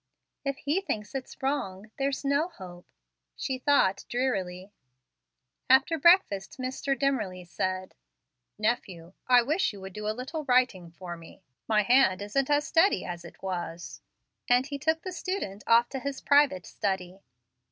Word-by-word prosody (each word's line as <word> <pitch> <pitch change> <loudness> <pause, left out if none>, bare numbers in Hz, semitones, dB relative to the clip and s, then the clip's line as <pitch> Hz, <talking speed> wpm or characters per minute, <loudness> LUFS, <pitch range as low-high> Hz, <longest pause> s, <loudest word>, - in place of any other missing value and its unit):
"If 275 -1 -2
he 300 +8 0
thinks 210 - -4
it's 265 0 -7
wrong, 215 -7 -2
there's 275 +1 -1
no 280 +4 +2
hope," 180 - -12 0.5
she 260 -1 -3
thought, 250 -8 +3
drearily. 195 -7 -2 1.0
After 265 +6 +5
breakfast 280 - +4
Mr. 265 +1 -2
Dimmerly 215 -10 -1
said, 185 +1 -3 0.6
"Nephew, 195 -6 -2
I 250 -1 +6
wish 310 +7 +1
you 200 - -10
would 190 0 -8
do 210 +1 -5
a 215 +1 -2
little 300 +5 -4
writing 250 -9 +2
for 175 +1 -8
me; 165 +3 -15 0.2
my 215 -1 +3
hand 220 -5 +4
isn't 260 +7 -1
as 295 0 +3
steady 330 +5 +3
as 175 -1 -6
it 170 - -14
was"; 175 -2 -5 0.5
and 245 +1 +4
he 285 0 -5
took 320 +3 0
the 370 - -5
student 355 - -4
off 235 +1 +5
to 270 - -4
his 280 +1 -4
private 285 -10 +3
study. 190 -2 -3
240 Hz, 150 wpm, -28 LUFS, 190-275 Hz, 1.0 s, I